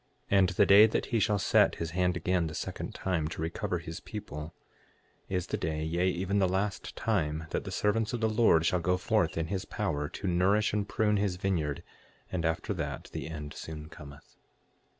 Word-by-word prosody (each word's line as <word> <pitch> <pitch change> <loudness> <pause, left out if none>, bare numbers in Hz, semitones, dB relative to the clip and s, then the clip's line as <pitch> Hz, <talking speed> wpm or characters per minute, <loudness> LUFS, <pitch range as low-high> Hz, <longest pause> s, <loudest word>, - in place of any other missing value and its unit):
6:2 100 - +5
And 95 -1 +4
the 95 +2 +3
day 100 +3 +8
that 110 - -1
he 115 - 0
shall 105 0 +2
set - - +4
his 80 -1 -4
hand 90 0 +1
again 90 -1 +1
the 80 - -6
second - - -5
time 85 -5 -1
to 80 - -7
recover 90 +3 -2
his 85 0 -7
people, 80 -7 -7 0.7
is 90 -2 -1
the - - -2
day, 80 -1 -2
yea, 85 +3 +1
even 95 +3 0
the 95 - +3
last 95 +2 -2
time, 80 -7 -1
that - - -2
the - - -5
servants 105 +1 +1
of 120 - -2
the 110 - +2
Lord 110 -7 +4
shall 90 - +2
go 90 +2 +1
forth 90 - +1
in 80 - 0
his 95 +2 -3
power, 75 0 -2
to 100 - -5
nourish 95 +5 +2
and 105 -1 -1
prune 105 -1 +2
his 100 -2 0
vineyard; 85 -6 -1 0.5
and 85 -3 -1
after 80 0 -1
that - - -5
the - - -4
end 75 -2 -6
soon 80 -1 -8
cometh. 70 -3 -13
90 Hz, 205 wpm, -30 LUFS, 80-100 Hz, 0.7 s, day